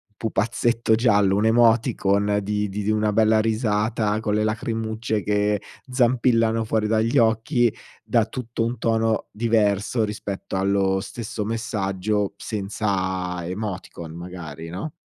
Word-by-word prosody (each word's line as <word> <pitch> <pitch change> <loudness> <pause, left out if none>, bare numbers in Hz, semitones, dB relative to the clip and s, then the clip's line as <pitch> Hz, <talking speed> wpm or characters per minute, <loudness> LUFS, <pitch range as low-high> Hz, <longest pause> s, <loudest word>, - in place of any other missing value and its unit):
pupazzetto 115 +1 +1
giallo, 105 -4 +3
un'emoticon 110 -2 +3
di 105 0 -1
di 100 +1 -4
di 105 - -1
una 105 0 +1
bella 110 +1 +4
risata 110 -1 0
con 105 -2 -1
le 105 - +2
lacrimucce 110 0 -2
che 105 0 +1 0.3
zampillano 115 -3 +2
fuori 110 -1 0
dagli 110 +1 +1
occhi, 115 +1 +3 0.3
dà 115 -3 +2
tutto 120 -1 -4
un 120 +1 -2
tono 115 -1 0
diverso 110 0 +1
rispetto 100 -2 -5
allo 95 0 +1
stesso 110 -1 -5
messaggio 105 -2 -1
senza 95 -4 -2
emoticon 95 -4 -5
magari, 85 -3 -8
no? 95 - -5
110 Hz, 120 wpm, -23 LUFS, 100-115 Hz, 0.3 s, bella